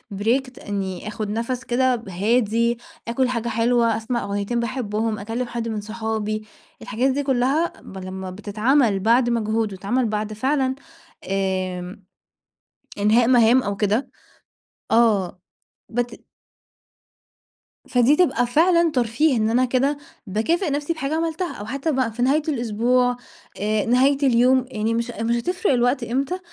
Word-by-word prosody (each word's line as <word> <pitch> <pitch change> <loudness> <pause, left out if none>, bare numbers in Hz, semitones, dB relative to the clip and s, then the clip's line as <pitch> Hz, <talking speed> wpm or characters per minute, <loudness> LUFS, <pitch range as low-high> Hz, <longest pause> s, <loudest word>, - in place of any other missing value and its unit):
break، 250 +6 -1
إني 195 -2 -4
آخد 210 0 -4
نَفَس 235 +4 -2
كده 250 -1 +1
هادي، 230 +4 +1 0.3
آكل 250 +2 +1
حاجة 235 -2 -2
حلوة، 230 0 +2
أسمع 235 +2 -2
أغنيتين 200 +4 -2
باحبهم، 225 -2 -2
أكلم 225 +4 -3
حد 235 -1 -4
من 220 -2 -3
صحابي، 215 0 -3 0.3
الحاجات 250 +5 0
دي 285 +2 -1
كلها 270 +5 +1
ب 195 - -11
لما 185 0 -6
بتتعمل 215 +3 +1
بعد 235 +4 +3
مجهود، 220 -2 0
وتتعمل 220 +7 -1
بعد 215 -1 -2
فعلًا 265 +3 0 0.5
آمم، 185 0 -2 1.0
إنهاء 220 +3 +4
مهام 245 0 +5
أو 200 -2 -3
كده، 210 +6 0 0.8
آه 210 -5 +2 0.5
بت 240 0 -3 1.6
فدي 250 +3 +4
تبقى 300 -8 +2
فعلًا 335 +5 +3
ترفيه، 250 +3 +1
إن 215 0 +1
أنا 250 +3 +3
كده 265 +3 +1 0.3
باكافئ 315 - 0
نَفْسي 290 +3 -1
بحاجة 310 -1 -3
عملتها، 330 +2 -2
أو 205 - -7
حتى 275 +7 -2
بَقى 260 -4 0
في 235 +3 -6
نهاية 275 +5 +3
الأسبوع، 245 -1 +1 0.4
آآ 210 0 0
نهاية 260 +4 +3
اليوم، 255 0 +4
يعني 220 0 -1
مش 235 +1 -2
مش 230 +1 -1
هتفرق 360 - 0
الوقت 245 +1 +1
إمتى، 270 +9 -2
235 Hz, 135 wpm, -22 LUFS, 215-260 Hz, 1.6 s, مهام